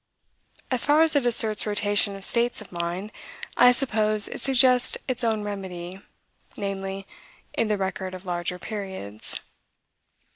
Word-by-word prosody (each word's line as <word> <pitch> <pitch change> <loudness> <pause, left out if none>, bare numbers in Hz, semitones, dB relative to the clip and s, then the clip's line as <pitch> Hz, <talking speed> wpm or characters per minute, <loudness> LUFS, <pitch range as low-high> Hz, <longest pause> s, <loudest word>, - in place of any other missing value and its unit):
As 255 -2 +2
far 300 +2 +5
as 320 -1 +4
it 275 -4 +3
asserts 220 -3 +3
rotation 205 -1 +1
of 195 0 -7
states 240 +1 +1
of 215 - -11
mind, 175 +4 -3 0.4
I 245 0 +7
suppose 215 -5 +1
it - - -7
suggests 255 -1 +4
its 255 -1 -1
own 220 -2 +1
remedy, 190 -2 -6 0.6
namely, 195 -1 -4 0.5
in 230 - +1
the 210 -1 +1
record 190 -1 -3
of 185 +1 -10
larger 175 0 -2
periods. 190 - -4
205 Hz, 140 wpm, -25 LUFS, 190-235 Hz, 0.6 s, I